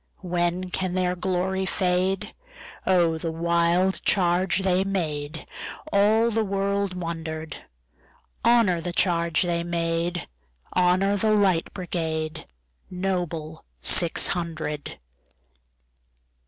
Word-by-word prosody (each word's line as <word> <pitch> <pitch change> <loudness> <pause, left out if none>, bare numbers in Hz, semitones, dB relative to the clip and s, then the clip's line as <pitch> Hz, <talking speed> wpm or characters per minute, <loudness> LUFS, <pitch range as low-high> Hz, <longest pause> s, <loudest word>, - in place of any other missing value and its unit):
When 175 +1 -1
can 185 -1 -2
their 180 -1 +1
glory 190 +1 -1
fade?O 185 - -1
the 165 0 -3
wild 170 +3 +1
charge 180 0 +2
they 185 0 +2
made! 155 -6 -3 0.5
All 215 +3 +4
the 225 0 +1
world 200 -1 -1
wonder'd. 160 -3 -5 0.9
Honor 225 -8 +4
the 175 +1 -4
charge 170 -3 +2
they 170 -1 -1
made! 170 0 -1 0.5
Honor 185 +3 +3
the 215 +2 +2
Light 190 -5 +2
Brigade, 160 -3 -3 0.4
Noble 175 -4 -3 0.2
six 170 -2 +5
hundred! 155 - -4
180 Hz, 95 wpm, -25 LUFS, 170-190 Hz, 0.9 s, six